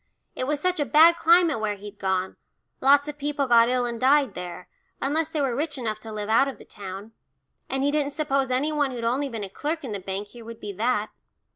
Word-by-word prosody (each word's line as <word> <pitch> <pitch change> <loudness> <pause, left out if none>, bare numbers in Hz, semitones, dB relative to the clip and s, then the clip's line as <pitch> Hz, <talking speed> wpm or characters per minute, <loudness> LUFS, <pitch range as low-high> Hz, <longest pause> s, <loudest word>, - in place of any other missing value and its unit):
It 255 - -3
was 295 0 0
such 365 +2 0
a - - +3
bad 325 +4 +6
climate 335 -6 +4
where 215 -1 -1
he'd 205 +1 -11
gone 190 -1 -1 0.5
lots 285 +2 +5
of 295 0 -7
people 285 -1 -1
got 235 -2 +5
ill 250 -1 +1
and 235 -1 -4
died 270 -3 +4
there, 180 0 -7 0.3
unless 310 +3 0
they 310 -2 -2
were 265 -4 0
rich 295 +2 -2
enough 220 -4 -3
to 220 0 -9
live 210 -1 -4
out 225 +5 +4
of 275 - -6
the - - -15
town, 200 +1 -9 0.6
and 270 0 -1
he 285 - +2
didn't 290 -1 0
suppose 275 -3 0
any 265 +5 +1
one 295 -2 +1
who'd 245 -3 -6
only 260 +5 0
been 225 -4 -5
a - - -4
clerk 305 - -3
in 255 - -5
the 200 - -3
bank 195 +2 -5
here 240 -1 -12
would 230 0 -10
be 205 -1 -6
that. 215 +1 -1
255 Hz, 240 wpm, -25 LUFS, 215-290 Hz, 0.6 s, bad